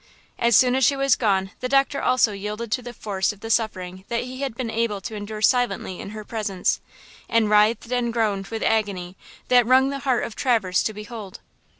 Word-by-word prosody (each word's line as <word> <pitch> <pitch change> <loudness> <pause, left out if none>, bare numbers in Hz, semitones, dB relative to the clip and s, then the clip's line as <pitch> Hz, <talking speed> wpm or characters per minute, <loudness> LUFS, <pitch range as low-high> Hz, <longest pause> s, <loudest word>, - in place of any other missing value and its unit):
As 235 -1 +3
soon 250 +2 +5
as 265 +1 +1
she 280 - +4
was 275 0 +3
gone 195 -4 0
the 255 - -3
doctor 275 +1 +2
also 255 -3 +3
yielded 210 +3 -5
to 250 - 0
the 245 0 -8
force 200 -5 -2
of 210 -1 -15
the 225 - -4
suffering 185 -5 -1
that 235 0 -1
he 255 +2 -7
had 270 -5 -3
been 235 -2 -3
able 225 -3 -1
to 220 - -6
endure 210 +1 -6
silently 240 -7 +1
in - - -7
her 215 0 -8
presence, 205 -5 -1 0.5
and 225 -2 +2
writhed 215 +3 +3
and 245 -1 0
groaned 210 -4 -1
with 225 -1 -4
agony–that 205 +3 0
wrung 260 +2 +5
the 280 - -4
heart 260 -3 0
of 230 - -5
Traverse 220 -9 +1
to 220 - -1
behold. 210 -2 -8
225 Hz, 205 wpm, -23 LUFS, 205-245 Hz, 0.5 s, soon